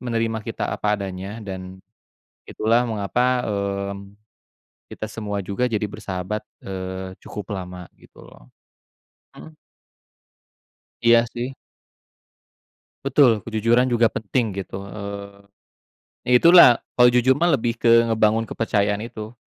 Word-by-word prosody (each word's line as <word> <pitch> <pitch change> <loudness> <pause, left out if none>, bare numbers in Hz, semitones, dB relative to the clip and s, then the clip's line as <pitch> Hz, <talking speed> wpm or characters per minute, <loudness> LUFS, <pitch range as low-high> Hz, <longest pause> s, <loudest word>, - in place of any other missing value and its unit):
menerima 115 -2 -1
kita 115 -2 -3
apa 105 0 0
adanya 95 +3 -6
dan 95 -1 -8 0.7
itulah 115 +3 +1
mengapa, 125 +4 0
eee, 100 -1 -2 1.0
kita 110 - -5
semua 105 -2 -4
juga 100 +7 -1
jadi 110 -1 -1
bersahabat, 95 +2 -5 0.2
eee, 95 0 -6
cukup 105 0 -7
lama, 90 -1 -8
gitu - - -18
loh. - - -17 0.9
Mhm. 155 -1 -13 1.5
Iya 115 0 +5
sih. 125 +3 -4 1.5
Betul, 120 -7 +3
kejujuran 115 +3 +1
juga 120 -1 +4
penting 110 -1 -2
gitu, 95 - -8
eee, 100 -1 -8 0.9
ya - - +4
itulah, 170 0 +9 0.3
kalau 125 0 +6
jujur 125 +2 +3
mah 170 +5 +1
lebih 120 -5 +1
ke 115 0 +1 0.2
ngebangun 110 0 +2
kepercayaan 105 -2 -1
itu. 110 0 -8
110 Hz, 115 wpm, -22 LUFS, 100-120 Hz, 1.5 s, itulah